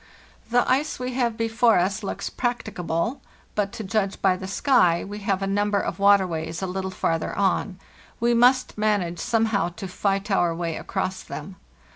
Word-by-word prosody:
"The 245 Hz, +1 st, +3 dB
ice 280 Hz, +4 st, +1 dB
we 255 Hz, 0 st, -4 dB
have 240 Hz, -3 st, 0 dB
before 225 Hz, 0 st, +3 dB
us 190 Hz, +4 st, 0 dB
looks 200 Hz, -, -4 dB
practicable, 225 Hz, -1 st, -2 dB, 0.3 s
but, 200 Hz, -1 st, -1 dB
to 235 Hz, -2 st, -5 dB
judge 195 Hz, 0 st, -1 dB
by 190 Hz, -2 st, +3 dB
the 190 Hz, +1 st, -7 dB
sky, 195 Hz, -5 st, +3 dB
we 205 Hz, +1 st, -7 dB
have 195 Hz, -1 st, -1 dB
a -, -, +1 dB
number 205 Hz, +1 st, +1 dB
of 185 Hz, -, -3 dB
water 200 Hz, -1 st, +5 dB
ways 165 Hz, 0 st, -4 dB
a -, -, +1 dB
little 190 Hz, +1 st, -3 dB
farther 165 Hz, -3 st, -1 dB
on; 195 Hz, -1 st, 0 dB, 0.4 s
we 235 Hz, +1 st, +2 dB
must 245 Hz, -1 st, +3 dB
manage 200 Hz, -6 st, 0 dB
somehow 225 Hz, -5 st, +1 dB
to 190 Hz, -, -5 dB
fight 195 Hz, +2 st, -1 dB
our 175 Hz, -3 st, +2 dB
way 165 Hz, -1 st, -3 dB
across 190 Hz, -1 st, -3 dB
them. 195 Hz, -, -8 dB
200 Hz, 175 wpm, -24 LUFS, 185-225 Hz, 0.4 s, water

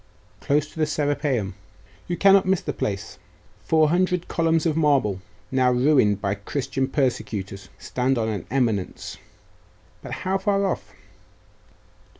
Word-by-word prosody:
'Close 145 Hz, +1 st, +1 dB
to -, -, -10 dB
the 155 Hz, -, +2 dB
Serapeium. 145 Hz, -9 st, -1 dB, 0.5 s
You 175 Hz, -, -2 dB
cannot 195 Hz, -1 st, +5 dB
miss 190 Hz, -2 st, +2 dB
the -, -, -4 dB
place: 100 Hz, 0 st, -4 dB, 0.4 s
four 155 Hz, -1 st, +3 dB
hundred 180 Hz, +1 st, +1 dB
columns 165 Hz, -1 st, +1 dB
of 160 Hz, -2 st, +1 dB
marble, 135 Hz, -12 st, +2 dB, 0.3 s
now 130 Hz, -1 st, +3 dB
ruined 125 Hz, -5 st, +3 dB
by 100 Hz, -1 st, -1 dB
Christian 130 Hz, +6 st, -2 dB
persecutors, 100 Hz, -8 st, -2 dB
stand 130 Hz, +1 st, -1 dB
on 110 Hz, -1 st, 0 dB
an 105 Hz, -2 st, -4 dB
eminence 115 Hz, -7 st, -1 dB, 0.4 s
' -, -, -33 dB
'But -, -, -9 dB
how 190 Hz, +1 st, +1 dB
far 200 Hz, 0 st, +1 dB
off? -, -, -3 dB
140 Hz, 140 wpm, -24 LUFS, 110-165 Hz, 0.5 s, cannot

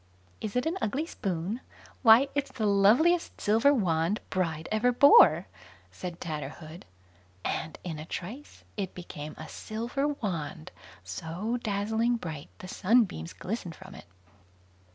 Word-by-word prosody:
"Is 215 Hz, 0 st, -4 dB
it 250 Hz, -, +1 dB
an 340 Hz, +4 st, -1 dB
ugly 275 Hz, +9 st, -1 dB
spoon? 195 Hz, -, -3 dB, 0.4 s
why, 240 Hz, +3 st, +7 dB
it's 280 Hz, -1 st, -1 dB
the 220 Hz, -, -2 dB
loveliest 225 Hz, -, +4 dB
silver 225 Hz, +7 st, +4 dB
wand 180 Hz, -, +1 dB
bride 165 Hz, -4 st, -1 dB
ever 220 Hz, +3 st, +3 dB
bore", 195 Hz, -, +7 dB, 0.5 s
said 170 Hz, -, -7 dB
Tatterhood; 155 Hz, +1 st, -6 dB, 0.6 s
and 155 Hz, -, -3 dB
in 160 Hz, -4 st, -5 dB
a 155 Hz, -, -7 dB
trice 220 Hz, -, -7 dB
it 195 Hz, -3 st, -4 dB
became 155 Hz, -4 st, -8 dB
a -, -, -8 dB
silver 235 Hz, +6 st, -3 dB
wand, 175 Hz, -, -4 dB, 0.3 s
so 165 Hz, -, -3 dB
dazzling 220 Hz, +3 st, 0 dB
bright, 155 Hz, -8 st, -7 dB
the 185 Hz, -, -9 dB
sunbeams 190 Hz, -, +1 dB
glistened 185 Hz, -4 st, -5 dB
from 190 Hz, +1 st, -12 dB
it. -, -, -12 dB
200 Hz, 135 wpm, -29 LUFS, 165-240 Hz, 0.6 s, why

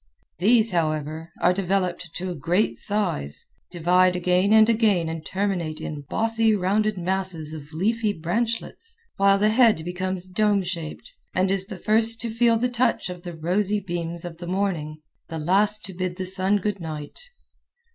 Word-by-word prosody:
These, 225 Hz, +3 st, +4 dB
however, 155 Hz, -1 st, -2 dB
are 180 Hz, -, +4 dB
developed 185 Hz, -2 st, -1 dB
to 185 Hz, 0 st, -3 dB
a -, -, -5 dB
great 175 Hz, +8 st, 0 dB
size, 185 Hz, -, -1 dB, 0.2 s
divide 180 Hz, +1 st, +3 dB
again 180 Hz, +2 st, +2 dB
and 220 Hz, 0 st, +7 dB
again 215 Hz, -7 st, +2 dB
and 160 Hz, -1 st, -5 dB
terminate 180 Hz, -5 st, -2 dB
in 145 Hz, -2 st, -6 dB
bossy, 225 Hz, -1 st, +2 dB
rounded 205 Hz, +2 st, +1 dB
masses 180 Hz, -4 st, -2 dB
of 150 Hz, -1 st, -9 dB
leafy 215 Hz, +6 st, 0 dB
branch 220 Hz, +7 st, -1 dB
lets, 455 Hz, -, -11 dB, 0.2 s
while 195 Hz, 0 st, +4 dB
the 210 Hz, +2 st, +3 dB
head 220 Hz, -8 st, +4 dB
becomes 185 Hz, +1 st, -2 dB
dome 200 Hz, +1 st, +1 dB
shaped, 175 Hz, -, -6 dB, 0.2 s
and 185 Hz, +1 st, +2 dB
is 195 Hz, -1 st, 0 dB
the 200 Hz, -3 st, -7 dB
first 225 Hz, +4 st, +2 dB
to 230 Hz, -1 st, -3 dB
feel 230 Hz, 0 st, +3 dB
the 245 Hz, +2 st, +1 dB
touch 245 Hz, -5 st, 0 dB
of 180 Hz, -1 st, -9 dB
the 175 Hz, -2 st, -8 dB
rosy 195 Hz, +6 st, 0 dB
beams 170 Hz, -2 st, -5 dB
of 170 Hz, -1 st, -8 dB
the 175 Hz, -, -7 dB
morning, 175 Hz, -5 st, -2 dB, 0.3 s
the 165 Hz, -, -5 dB
last 200 Hz, +7 st, +3 dB
to 190 Hz, -, -7 dB
bid 180 Hz, 0 st, -3 dB
the 185 Hz, 0 st, -4 dB
sun 190 Hz, +2 st, +1 dB
good 205 Hz, 0 st, -2 dB
night. 155 Hz, -3 st, -7 dB
185 Hz, 170 wpm, -24 LUFS, 170-210 Hz, 0.3 s, and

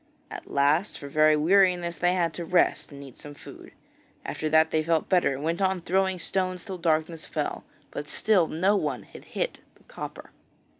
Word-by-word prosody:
At -, -, -9 dB
last 145 Hz, +8 st, +1 dB
for 140 Hz, -, -8 dB
very 155 Hz, +1 st, +4 dB
weariness 175 Hz, +1 st, +3 dB
they 180 Hz, +1 st, +2 dB
had 170 Hz, -3 st, 0 dB
to 175 Hz, -, -5 dB
rest, 175 Hz, -1 st, +1 dB
and 140 Hz, 0 st, -10 dB
eat 135 Hz, -3 st, -13 dB
some 145 Hz, 0 st, -11 dB
food. -, -, -13 dB, 0.5 s
After 155 Hz, -, -3 dB
that 160 Hz, +1 st, +4 dB
they 155 Hz, -, +2 dB
felt 160 Hz, 0 st, 0 dB
better 180 Hz, -6 st, +3 dB
and 140 Hz, -, -7 dB
went 165 Hz, +4 st, -1 dB
on 190 Hz, -1 st, +1 dB
throwing 190 Hz, +2 st, 0 dB
stones 185 Hz, 0 st, -2 dB
till 190 Hz, -2 st, -7 dB
darkness 160 Hz, -1 st, 0 dB
fell, -, -, -4 dB, 0.3 s
but 150 Hz, -, -6 dB
still 195 Hz, -6 st, +2 dB
no 185 Hz, +7 st, +1 dB
one 150 Hz, -9 st, -2 dB
had -, -, -14 dB
hit -, -, -3 dB, 0.2 s
the -, -, -25 dB
copper. -, -, -9 dB
170 Hz, 190 wpm, -26 LUFS, 155-185 Hz, 0.5 s, very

